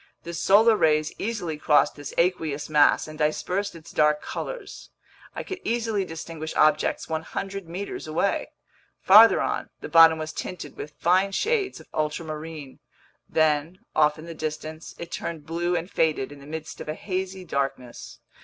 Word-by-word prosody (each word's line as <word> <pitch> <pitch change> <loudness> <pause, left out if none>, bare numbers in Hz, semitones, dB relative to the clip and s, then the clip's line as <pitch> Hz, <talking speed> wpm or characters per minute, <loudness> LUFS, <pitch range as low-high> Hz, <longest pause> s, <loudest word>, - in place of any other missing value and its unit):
The 170 - -7
solar 210 +6 +5
rays 155 -5 +2
easily 180 -9 -3
crossed 150 -1 +3
this 145 -1 -8
aqueous 160 -5 0
mass 150 0 +4
and 155 0 -10
dispersed 180 +6 -1
its 165 -1 -12
dark 150 0 +3
colors. - - -7 0.5
I - - -4
could 380 -1 -6
easily 225 -4 -1
distinguish 160 -1 -7
objects 155 0 +2
100 175 +3 -4
meters 185 -1 -5
away. 165 +6 0 0.5
Farther 215 +4 +8
on, - - -2
the - - -6
bottom 165 -1 +7
was 155 0 -5
tinted 175 -6 -6
with 150 - -8
fine 185 +3 +2
shades 425 - 0
of - - -15
ultramarine; 155 -2 -4 0.5
then, 155 +2 +1 0.2
off 150 0 +4
in 155 - -10
the 170 - -7
distance, 155 0 -6
it 170 0 -8
turned 160 -3 -5
blue 170 +2 -1
and 170 0 -2
faded 155 -7 0
in 145 - -11
the 140 - -13
midst 160 +1 -7
of - - -7
a 155 - -2
hazy 190 0 -4
darkness. 135 -5 -4
160 Hz, 160 wpm, -25 LUFS, 155-185 Hz, 0.5 s, Farther